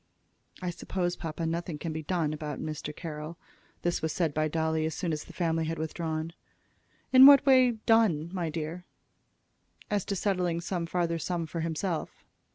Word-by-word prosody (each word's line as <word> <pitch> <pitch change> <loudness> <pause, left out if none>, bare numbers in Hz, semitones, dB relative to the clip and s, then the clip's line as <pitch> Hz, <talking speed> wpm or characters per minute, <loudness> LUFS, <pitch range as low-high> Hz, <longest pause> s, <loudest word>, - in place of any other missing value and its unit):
"I 180 - -1
suppose, 175 0 -2
papa, 165 0 -4
nothing 165 -1 -2
can 160 +1 -4
be 160 - -3
done 155 -2 -1
about 150 -1 -5
Mr. 155 -1 -4
Carroll." 155 0 -6 0.5
This 175 0 0
was 160 - -1
said 165 -3 0
by 155 +1 +1
Dolly 160 0 0
as 160 - -4
soon 170 -4 -2
as 150 - -4
the - - -12
family 165 -2 0
had 165 +1 -3
withdrawn. 160 0 -3 0.8
"In 260 +1 +11
what 280 -1 +8
way 255 -3 +6
'done,' 180 -9 +3
my 175 -4 -2
dear?" 160 +2 -5 1.1
"As 205 -2 +1
to 200 - -2
settling 180 -3 0
some 170 -1 -3
farther 170 -1 0
sum 170 +1 -2
for 165 +2 -5
himself." 165 +1 -3
165 Hz, 170 wpm, -29 LUFS, 155-180 Hz, 1.1 s, In